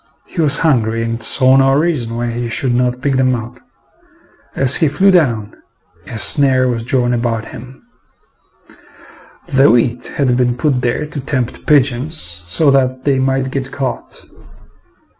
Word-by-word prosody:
He 170 - -4
was 145 -2 0
hungry 115 -7 +1
and 115 0 -4
saw 130 +3 +3
no 135 0 +3
reason 145 -7 -1
why 120 0 -2
he 120 0 -4
should 125 +2 0
not 125 0 0
pick 135 -1 0
them 130 -1 +2
up. 115 0 -8 1.0
As 135 -1 +1
he 160 - +2
flew 195 +7 +3
down, 120 - +1 0.5
a 115 - -7
snare 130 +2 +1
was 120 -2 -2
drawn 125 +1 0
about 115 -2 -2
him. 130 +1 -12 1.6
The 140 -4 +3
wheat 120 +1 +1
had 130 -4 0
been 125 -1 0
put 135 -2 0
there 125 +5 -1
to 150 -1 -7
tempt 130 -3 -4
pigeons 145 +1 +2 0.3
so 140 - +2
that 130 -1 0
they 135 -1 +1
might 130 0 -1
get 135 0 -4
caught. 135 -3 -5
130 Hz, 155 wpm, -15 LUFS, 120-140 Hz, 1.6 s, saw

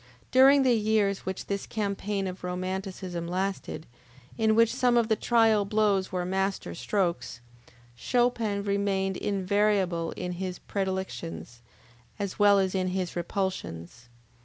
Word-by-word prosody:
During 270 +2 +7
the 255 -2 +4
years 210 -3 +1
which 190 0 -4
this 200 -1 -3
campaign 200 -1 -2
of 185 -1 -6
Romanticism 185 -1 -4
lasted, 185 -2 -3 0.5
in 220 -1 +2
which 230 0 +4
some 250 -2 +2
of 235 -1 +2
the 220 - +4
trial 225 -2 +3
blows 200 -2 +1
were 180 -1 -2
master 190 +1 -2
strokes, 175 - -2 0.6
Chopin 230 - 0
remained 200 -1 0
invariable 195 -4 +1
in 180 0 -4
his 180 0 -4
predilections, 120 - -4 0.6
as 200 -1 -4
well 205 -1 +6
as 190 -1 +1
in 185 -1 0
his 185 -1 -2
repulsions. 165 - -4
195 Hz, 130 wpm, -28 LUFS, 185-210 Hz, 0.6 s, During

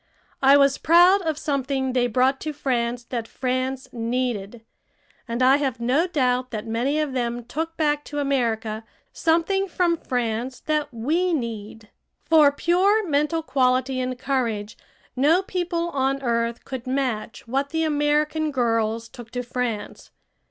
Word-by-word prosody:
I 275 +1 +7
was 275 -1 +3
proud 355 +4 +6
of 320 -4 -2
something 270 -3 -1
they 245 -1 +2
brought 255 +3 +2
to 305 0 -3
France 240 -3 -1
that 235 -3 -3
France 255 +1 -2
needed, 230 -2 -3 0.6
and 235 +2 -1
I 265 +2 +6
have 270 -4 -2
no 260 +9 +2
doubt 255 -6 0
that 220 -2 -5
many 245 +7 0
of 300 -3 -1
them 240 -1 -2
took 320 +6 -4
back 295 -2 +1
to 290 - -7
America 230 -6 -1 0.3
something 340 +4 +1
from 345 -2 +1
France 245 -1 -2
that 300 -1 -1
we 320 +10 0
need. 220 -5 -5 0.3
For 310 -3 +6
pure 375 +7 +2
mental 300 +2 +1
quality 260 -2 +1
and 255 0 -2
courage, 235 -6 -2 0.4
no 310 +8 +3
people 350 -2 -2
on 275 0 0
earth 235 -1 -1
could 260 -1 -6
match 255 -5 -2
what 275 +4 -1
the 320 +1 -1
American 300 +1 +1
girls 230 -4 0
took 235 0 -12
to 250 +1 -4
France. 240 -3 -4
265 Hz, 145 wpm, -23 LUFS, 240-300 Hz, 0.6 s, I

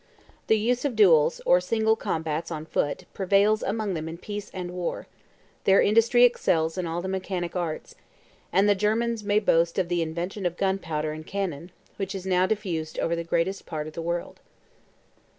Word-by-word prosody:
The 220 - +4
use 240 +3 0
of 280 -5 -1
duels, 170 -7 +5
or 180 - +5
single 220 +3 +2
combats 160 -6 -3
on 155 -2 -5
foot, 145 -2 -2
prevails 200 +3 +3
among 210 -1 -2
them 160 -1 -4
in 165 - -7
peace 205 +2 -6
and 180 -2 -5
war: 180 -1 -4 0.6
their 195 0 +6
industry 230 +3 +4
excels 165 -9 +2
in 180 -2 -2
all 170 +2 -3
the - - -3
mechanic 185 -2 -3
arts; 170 -3 -3 0.6
and 195 +2 +4
the 205 - +6
Germans 220 +3 0
may 205 0 +2
boast 170 -5 +2
of 185 -3 0
the 175 -1 +1
invention 175 +4 -3
of 175 0 -5
gunpowder 165 -6 -1
and 155 +1 -8
cannon, 180 -5 -4 0.3
which 195 0 -3
is 190 -1 -6
now 185 0 +2
diffused 180 -7 -3
over 170 - 0
the 170 - -3
greatest 170 +3 -1
part 155 -3 -4
of 155 - -8
the 165 - -5
world. 170 +1 -4
180 Hz, 185 wpm, -26 LUFS, 165-205 Hz, 0.6 s, their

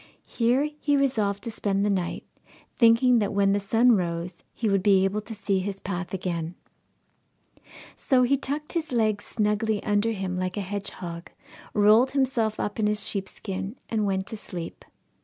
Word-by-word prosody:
Here 250 +5 +1
he 290 -1 +2
resolved 215 -8 0
to 230 - -4
spend 200 -2 0
the - - +2
night, 185 -3 -2 0.5
thinking 235 +1 +5
that 205 -1 -1
when 200 0 +3
the 205 - +2
sun 225 +5 +3
rose 170 -3 -1
he 230 - -3
would 195 -2 +2
be 195 -1 +4
able 200 +2 -1
to 220 +1 -8
see 200 -1 0
his 195 +1 -4
path 185 -2 -4
again. 175 -3 -3 1.4
So 255 -2 +2
he 260 +3 +3
tucked 285 +2 -4
his 330 -2 -2
legs 215 -3 +1
snugly 210 0 0
under 205 +2 +1
him 190 -3 -3
like 185 +2 -3
a - - 0
hedgehog, 185 -3 -5 0.5
rolled 215 +5 +5
himself 235 -5 +1
up 205 +2 -3
in 210 - +2
his 210 0 0
sheepskin, 195 +1 -4
and 220 -2 0
went 190 -1 -1
to 220 - -6
sleep. 175 -4 -7
205 Hz, 170 wpm, -26 LUFS, 190-230 Hz, 1.4 s, thinking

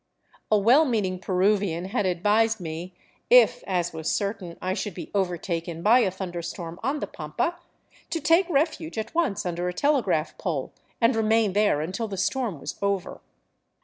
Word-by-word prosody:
A 215 - +5
well 240 +10 +5
meaning 205 -9 -1
Peruvian 190 -2 +1
had 205 0 -1
advised 210 +5 +2
me, 170 +1 -6 0.4
if, - - +6
as 175 -3 -1
was 160 0 -3
certain,. 200 -4 -3
I 185 0 -2
should 190 -2 -4
be - - -8
overtaken 170 -3 -2
by 230 +5 +6
a 215 - +3
thunder 180 -2 -5
storm 170 0 -7
on 275 +5 -1
the - - -1
pampa, 205 - -3 0.5
to 335 - -1
take 330 +5 +3
refuge 315 -1 0
at 220 +4 -4
once 325 - 0
under 175 0 -2
a - - -4
telegraph 210 - +1
pole 150 -8 -3 0.3
and 230 +1 +3
remain 220 -2 +2
there 205 -7 +2
until 185 +8 -3
the 195 -2 -6
storm 200 - -1
was - - -7
over. 200 -2 -2
200 Hz, 170 wpm, -25 LUFS, 175-230 Hz, 0.5 s, if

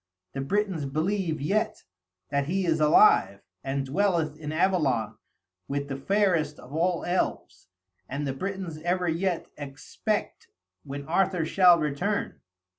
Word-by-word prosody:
The 135 - -3
Britons 190 0 -1
believe 165 +3 -1
yet 195 +10 -1 0.5
that 140 0 0
he 190 +3 0
is 160 -2 +1
alive, 150 - +5 0.2
and 135 0 -2
dwelleth 165 0 +1
in 150 -1 -6
Avalon 135 - +1 0.5
with 140 0 -3
the 135 - -3
fairest 170 -1 +1
of 135 - -13
all 170 +2 0
elves; 175 - -2 0.4
and 140 +3 -3
the 135 - -2
Britons 185 0 -5
ever 180 +1 0
yet 170 +1 0
expect 140 -2 -4 0.4
when 140 0 -6
Arthur 180 0 +1
shall 180 0 +6
return. 160 +7 -2
160 Hz, 130 wpm, -27 LUFS, 140-185 Hz, 0.5 s, shall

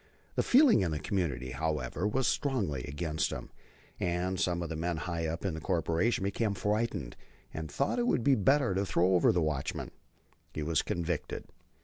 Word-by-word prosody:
The - - +1
feeling 260 - +6
in 90 - +1
the 75 - -1
community, 75 -8 -2
however, 75 +4 -1
was 125 +5 +1
strongly 100 - 0
against 75 +1 -1
him, - - -6 0.5
and 90 +1 -1
some 85 -1 0
of 85 - -5
the 80 - -3
men 85 +1 -1
high 85 0 -2
up 85 +4 -4
in 95 - 0
the 80 - -4
corporation 90 +4 +1
became 100 +1 0
frightened 105 - -1 0.4
and 80 -1 -5
thought 140 - 0
that - - +1
it 240 - +1
would 120 - +2
be 140 - +5
better 130 +1 +3
to 95 +1 +1
throw 95 -1 +2
over 90 - +5
the 90 -2 +1
watchman. 75 -3 -2 0.6
He 75 - -2
was 80 0 +2
convicted. 85 -2 -3
90 Hz, 190 wpm, -31 LUFS, 80-105 Hz, 0.6 s, feeling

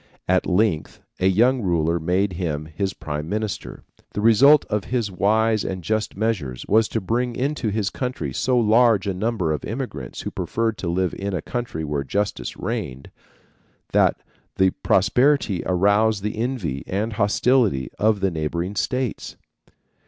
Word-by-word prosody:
At 90 0 +2
length 95 -3 0 0.2
a 95 - +3
young 120 +7 +3
ruler 85 -3 +1
made 90 +4 0
him 80 -4 -3
his 85 +5 -3
prime 75 -2 -5
minister. 105 0 -4 0.3
The 105 - -2
result 135 +7 +6
of 105 -2 -2
his 120 -5 -1
wise 110 +3 +2
and 95 -2 -4
just 110 +1 -2
measures 95 - -2
was 110 +1 +4
to 115 - -2
bring 120 +4 -1
into 135 -3 -1
his 105 -1 -1
country 125 - -4
so 125 - +1
large 115 -2 +4
a 100 - -1
number 95 -3 -1
of 75 - -2
immigrants 115 - -5
who - - -5
preferred 115 -1 -2
to 90 - -4
live 90 +1 0
in 100 -1 -2
a - - -2
country 120 -10 -4
where 75 -2 -2
justice 100 +8 -2
reigned, 65 +2 -4 0.8
that - - +3 0.4
the 95 -1 +3
prosperity 110 +2 +2
aroused 100 +3 +2
the 105 - -2
envy 110 - -2
and 105 +4 -2
hostility 105 - +2
of 105 -1 +2
the 95 -1 +1
neighboring 85 +4 -3
states. 125 +7 -2
100 Hz, 155 wpm, -23 LUFS, 90-115 Hz, 0.8 s, result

